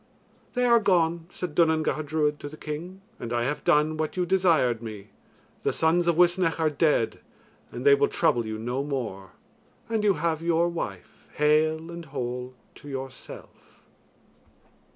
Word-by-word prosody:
"They 250 -1 +1
are 235 -1 +6
gone," 170 -5 +1
said 180 -3 -5
Duanan 160 -1 +3
Gacha 155 - -1
Druid 150 0 0
to 145 - -7
the 155 - -11
king, 170 +6 -7 0.2
"and 115 - -6
I 120 0 0
have 145 +5 -2
done 150 +1 +3
what 155 +3 -3
you 180 - +1
desired 165 -11 +2
me. 105 -3 -8 0.5
The - - +1
sons 170 +2 +2
of 170 - +3
Uisnech 175 -1 +3
are 160 -1 +2
dead 150 -6 +1 0.5
and 120 - -7
they 140 - +8
will 140 0 +4
trouble 120 - +1
you 110 -1 -5
no 125 +5 -2
more; 115 -10 -5 0.5
and 225 -2 -1
you 200 -2 +4
have 160 0 -1
your 170 0 +2
wife 100 - -7
hale 155 +2 +2
and 170 0 -8
whole 125 -2 -5 0.2
to 145 - -11
yourself." 135 -1 -9
155 Hz, 165 wpm, -26 LUFS, 130-170 Hz, 0.5 s, they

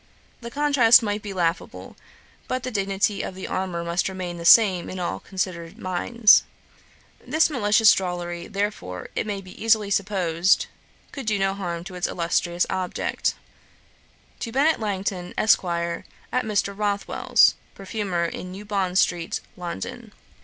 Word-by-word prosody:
The 235 - -7
contrast 260 -4 +5
might 205 0 -2
be 205 - -6
laughable; 175 -2 -3 0.5
but 255 0 -2
the 255 - -4
dignity 200 0 0
of 185 - -6
the 190 - -7
armour 180 -2 -3
must 170 +3 -1
remain 180 -2 -5
the 170 - -7
same 190 -3 +6
in 185 - -6
all 175 - -3
considerate 180 -3 -4
minds. 205 +5 +4 0.8
This 315 0 +2
malicious 215 -4 +5
drollery, 175 -2 -4
therefore, 195 - -4
it - - -2
may 205 -1 -2
easily 215 +2 +1
be - - -8
supposed, 185 -3 +2 0.5
could 270 -5 -7
do 210 -1 +1
no 195 0 +1
harm 175 -4 -4
to 190 +1 -9
its 180 -1 -2
illustrious 175 0 0
object. 185 -1 -2 1.0
'To 230 - -5
BENNET 285 +6 +2
LANGTON, 195 -4 -3
ESQ., 215 - +4
AT 170 +7 -3
MR. 205 -2 0
ROTHWELL'S, 205 -1 +2 0.2
PERFUMER, 195 -3 -2
IN 180 +2 -6
NEW 200 +3 -9
BOND 195 -3 -1
STREET, 170 -3 +1 0.2
LONDON. 175 - -7
190 Hz, 145 wpm, -24 LUFS, 175-210 Hz, 1.0 s, same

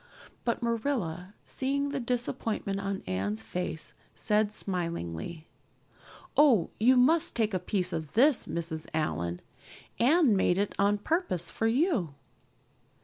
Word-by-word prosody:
But 235 0 -1
Marilla, 220 - -2
seeing 280 +2 -1
the 280 -1 -2
disappointment 235 -5 -2
on 195 -1 -3
Anne's 100 +4 -2
face, 160 +5 -4 0.2
said 210 -1 +1
smilingly: 170 - -4 0.9
"Oh, 265 - +5
you 250 +4 +5
must 310 +6 +4
take 220 -3 +1
a 185 - +1
piece 180 0 -1
of 160 -3 -4
this, 270 +3 +4
Mrs. 160 -2 -3
Allan. 85 - -2 0.6
Anne 275 - +5
made 185 -2 +2
it 205 0 0
on 200 +1 +3
purpose 205 - -1
for 225 - 0
you." 230 - +1
205 Hz, 125 wpm, -29 LUFS, 165-245 Hz, 0.9 s, Oh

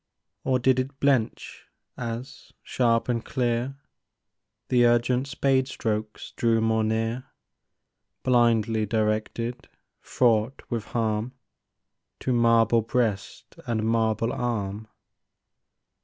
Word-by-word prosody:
Or 130 - +2
did 130 +1 +2
it 135 +1 -4
blench 135 -5 0 0.3
as, 125 +3 -7
sharp 115 -2 +1
and 120 -2 -1
clear, 125 +1 -1 0.9
The 120 -1 +5
urgent 125 +2 +2
spade 135 -1 +1
strokes 110 -4 -4
drew 115 -1 +1
more 110 0 +1
near, 115 +3 -1 1.0
Blindly 115 -3 +2
directed, 110 +2 -2 0.3
fraught 115 +1 +1
with 115 -3 -2
harm 110 +1 -2 0.9
To 130 - 0
marble 115 -1 +4
breast 110 -3 -2
and 110 -2 -1
marble 115 0 +1
arm? 110 -3 -3
115 Hz, 95 wpm, -26 LUFS, 110-125 Hz, 1.0 s, The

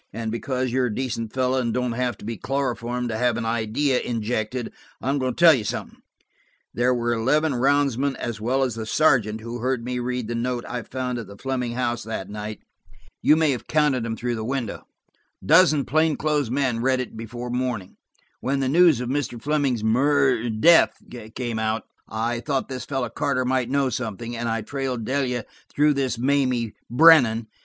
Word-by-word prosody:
And 110 0 -4
because 130 +2 -2
you're 130 0 +1
a 105 - -4
decent 115 -4 -3
fellow 130 0 +1
and 120 -2 -1
don't 125 -1 0
have 120 -2 -2
to - - -12
be 115 +1 -3
chloroformed 125 -2 -2
to 110 - -2
have 125 -1 +2
an 120 - -3
idea 115 +4 0
injected, 115 +1 -3 0.3
I'm 140 +2 -1
going 130 -2 -1
to - - -12
tell 170 -2 +8
you 125 -6 -1
something. 105 - -5 0.7
There 125 +1 +2
were 120 -1 0
eleven 140 +7 +1
roundsmen 140 +1 +1
as 115 -3 -5
well 130 +4 +1
as 125 -3 -1
the 110 0 -6
sergeant 110 -7 +2
who 115 +2 -6
heard 125 -1 -1
me 125 0 -2
read 125 -1 -3
the 120 - -3
note 120 +1 -2
I 125 - -4
found 125 +1 -4
at 115 - -7
the 100 - -12
Fleming 125 -1 -2
house 120 -1 -1
that 105 -3 -5
night. 105 0 -6 0.6
You 150 - +5
may 160 -2 +3
have 125 - -4
counted 150 -5 +2
them 115 0 -3
through 120 0 -2
the 110 -2 -4
window. 125 -2 -4 0.6
A - - -11
dozen 155 -3 +5
plain 155 +1 +2
clothes 150 -4 0
men 130 -3 0
read 130 +1 +2
it 125 - -5
before 120 +2 -6
morning. 125 -6 -3 0.4
When 135 +1 -1
the 135 - 0
news 165 -4 +5
of 125 - -3
Mr. 130 -3 -2
Fleming's 140 -5 0
mur–death 130 +3 +4 0.4
came 120 -3 -3
out, 110 +1 -1 0.3
I 115 +2 -2
thought 135 +2 -2
this 130 -2 -5
fellow 135 -4 -2
Carter 130 +1 -1
might 130 -1 0
know 140 0 +1
something, 115 0 -4
and 120 0 -2
I 115 -1 -1
trailed 130 -2 -3
Delia 125 -3 -1 0.2
through 150 +1 +3
this 135 -4 -1
Mamie 125 -3 +1 0.2
Brennan. 120 -5 +6
125 Hz, 190 wpm, -24 LUFS, 115-135 Hz, 0.7 s, tell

